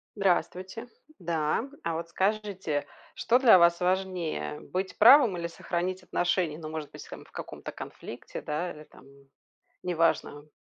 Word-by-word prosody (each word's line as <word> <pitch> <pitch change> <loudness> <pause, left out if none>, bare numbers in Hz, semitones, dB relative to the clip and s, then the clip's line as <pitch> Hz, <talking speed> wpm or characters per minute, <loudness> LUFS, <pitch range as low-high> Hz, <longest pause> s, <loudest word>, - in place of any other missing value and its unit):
Здравствуйте. 190 +3 -1 0.3
Да. 170 - -1
А 165 - -1
вот 170 0 -5
скажите, 190 -5 -1 0.3
что 245 +2 +2
для 240 -7 +8
вас 170 0 +5
важнее: 180 - -1
быть 185 +1 -4
правым 235 -4 +7
или 170 0 -3
сохранить 180 +2 -3
отношения? 175 -3 0
Ну, 155 -2 -7
может 155 -2 -6
быть, - - -10
там, - - -9
в - - -22
каком-то - - -7
конфликте, - - -8
да, 165 +4 -3
или 150 - -11
там, - - -18 0.8
неважно. 165 -4 0
175 Hz, 140 wpm, -28 LUFS, 160-190 Hz, 0.8 s, для